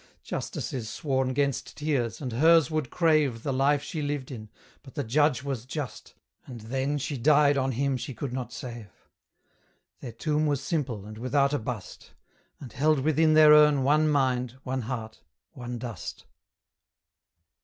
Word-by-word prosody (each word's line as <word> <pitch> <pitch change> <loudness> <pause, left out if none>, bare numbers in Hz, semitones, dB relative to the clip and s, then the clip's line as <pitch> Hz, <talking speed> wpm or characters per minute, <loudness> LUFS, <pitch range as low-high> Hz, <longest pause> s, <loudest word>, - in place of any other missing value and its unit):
Justice - - -5
is 115 -5 -4
sworn 130 -2 -1
'gainst 140 0 -1
tears, 135 -7 -1
and 130 -4 -4
hers 160 +5 +5
would 155 -5 -1
crave 155 -9 +2
The 140 - -1
life 140 +2 +2
she 160 - -4
lived 145 -2 -3
in; 110 -4 -8 0.3
but 135 - -15
the 145 - -2
judge 145 +3 +2
was 135 -5 -3
just, 130 -2 -7 0.3
And 120 -3 -9
then 135 +6 -2
she 140 -1 -4
died 145 +2 +4
on 135 -1 0
him 135 +2 0
she 125 +1 -6
could 130 +2 -5
not 130 -1 -4
save. 120 -4 -8 1.1
Their 125 - -7
tomb 150 +5 0
was 145 -2 +1
simple, 135 - -3
and 110 +1 -9
without 140 +3 +1
a 145 - +1
bust, 110 -2 -7 0.5
And 125 -5 -10
held 150 +1 +2
within 155 +2 +3
their 155 -1 +8
urn 150 -2 +6
one 155 +3 +3
mind, 130 -3 0
one 130 0 -2
heart, 110 -2 -6 0.3
one 125 -4 -6
dust. 120 -2 -7
135 Hz, 165 wpm, -27 LUFS, 125-150 Hz, 1.1 s, their